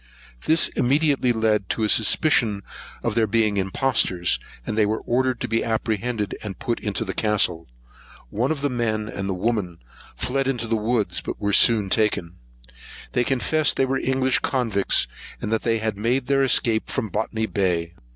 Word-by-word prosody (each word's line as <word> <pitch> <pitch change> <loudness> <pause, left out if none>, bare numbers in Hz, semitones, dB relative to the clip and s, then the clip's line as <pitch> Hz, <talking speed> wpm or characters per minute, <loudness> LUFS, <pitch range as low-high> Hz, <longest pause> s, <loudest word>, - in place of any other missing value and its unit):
This 160 +1 +4
immediately 140 -1 +2
led 110 -3 0
to 110 - -1
a - - +2
suspicion 110 -2 +3 0.4
of 120 - 0
their 110 -1 +2
being 110 -1 +1
impostors; 95 -3 +1 0.3
and - - -3
they 110 - +3
were 110 +2 -1
ordered 130 +1 0
to - - -2
be 115 - 0
apprehended, 110 -1 -2
and 100 -4 -6
put 120 -2 -2
into 105 +1 -2
the 95 - -4
castle. 100 -6 +1 0.6
One 120 +5 0
of 155 -3 -2
the 145 - 0
men, 110 -3 -1
and 95 -2 -5
the 95 - -1
woman, 95 -4 -2 0.4
fled 135 +1 -1
into 120 -4 -1
the 115 0 0
woods; 110 0 -1
but - - -6
were 100 -1 -1
soon 105 -2 +4
taken. 90 -5 0 0.7
They 125 - +1
confessed 135 +4 +1
they 135 - +3
were 135 0 -1
English 130 0 +1
convicts, 115 -7 0 0.3
and 105 - -4
that 110 - +1
they 115 -1 +1
had 110 -2 -3
made 125 +4 0
their 135 +1 +2
escape 115 -4 +2
from 115 -6 -2
Botany 110 +1 -2
Bay. 90 -5 -1
110 Hz, 175 wpm, -23 LUFS, 105-125 Hz, 0.7 s, This